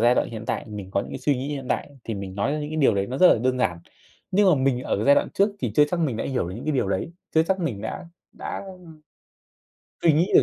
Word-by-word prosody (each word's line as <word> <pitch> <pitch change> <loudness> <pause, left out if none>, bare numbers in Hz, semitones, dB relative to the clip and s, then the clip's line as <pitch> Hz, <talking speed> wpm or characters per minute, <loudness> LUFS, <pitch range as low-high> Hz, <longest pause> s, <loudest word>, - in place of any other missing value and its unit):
giai 120 +2 +5
đoạn - - +1
hiện 110 -1 -6
tại - - -1
thì - - -12
mình 100 -2 -7
có 100 - +1
những - - -6
suy 145 - +1
nghĩ 130 +3 -4
hiện 140 -3 -4
tại - - -1
thì 115 - -3
mình 100 -1 -6
nói 100 +8 0
ra 155 - -1
những 150 0 -4
cái 155 - -4
điều 135 -8 +4
đấy 100 0 0
nó 130 +2 -4
rất 185 - +8
là - - +5
đơn 130 +2 0
giản. 85 -9 0 0.5
Nhưng 195 +1 +4
mà 180 - +6
mình 130 -2 +1
ở - - -1
cái 105 - -1
giai 140 - +7
đoạn - - +1
trước 200 +2 +3
thì - - -2
chưa 150 - +6
chắc 175 - 0
mình 140 -9 0
đã - - -2
hiểu 125 -10 -1
được 90 - -6
những 115 - -7
cái 155 - 0
điều 130 -8 0
đấy, 100 - -2 0.2
chưa 160 - +6
chắc 190 +4 0
mình 120 -12 -2
đã 110 - -5 0.3
đã, - - -5
ưm, 180 -1 -16 1.2
suy 165 - +5
nghĩ 165 +6 +2
được - - +8
130 Hz, 305 wpm, -24 LUFS, 110-155 Hz, 1.2 s, rất